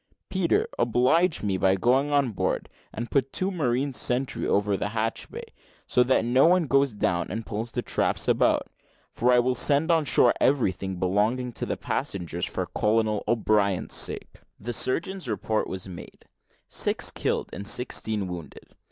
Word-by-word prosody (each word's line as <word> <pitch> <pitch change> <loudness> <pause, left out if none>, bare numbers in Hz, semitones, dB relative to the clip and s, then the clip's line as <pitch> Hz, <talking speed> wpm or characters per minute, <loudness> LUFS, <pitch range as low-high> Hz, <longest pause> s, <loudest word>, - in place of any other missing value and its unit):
Peter, 185 -3 +1
oblige 125 +9 +2
me 100 -2 0
by 95 0 +3
going 130 +9 +2
on 140 -4 +2
board, 100 - -2 0.2
and 120 +1 -6
put 135 -1 +1
two 185 +1 -1
marines 135 -5 -1
sentry 125 +2 -1
over 100 0 +1
the 105 - -2
hatchway, 110 +1 -3 0.4
so 125 - +2
that 125 -2 +3
no 130 +5 +4
one 180 0 +4
goes 135 -4 +2
down 90 -3 0
and 110 +3 -4
pulls 115 +2 -4
the - - -3
traps - - 0
about; - - +2 0.5
for 125 +1 +1
I'll 125 +1 +3
send 145 +6 +3
on 165 -2 +3
shore 120 -3 +4
everything 95 -8 +1
belonging 105 +8 0
to - - -4
the - - -2
passengers, 85 -2 -3
for - - -2
Colonel 110 -1 0
O'Brien's 105 -5 +1
sake." - - -2 0.2
The 120 +4 -4
surgeon's 170 +7 -1
report 110 0 -1
was 95 0 -5
made 90 -2 -11 0.4
six - - 0
killed - - -2
and 100 0 -6
sixteen 110 -3 -1
wounded. 90 -3 -9
120 Hz, 160 wpm, -26 LUFS, 100-135 Hz, 0.5 s, no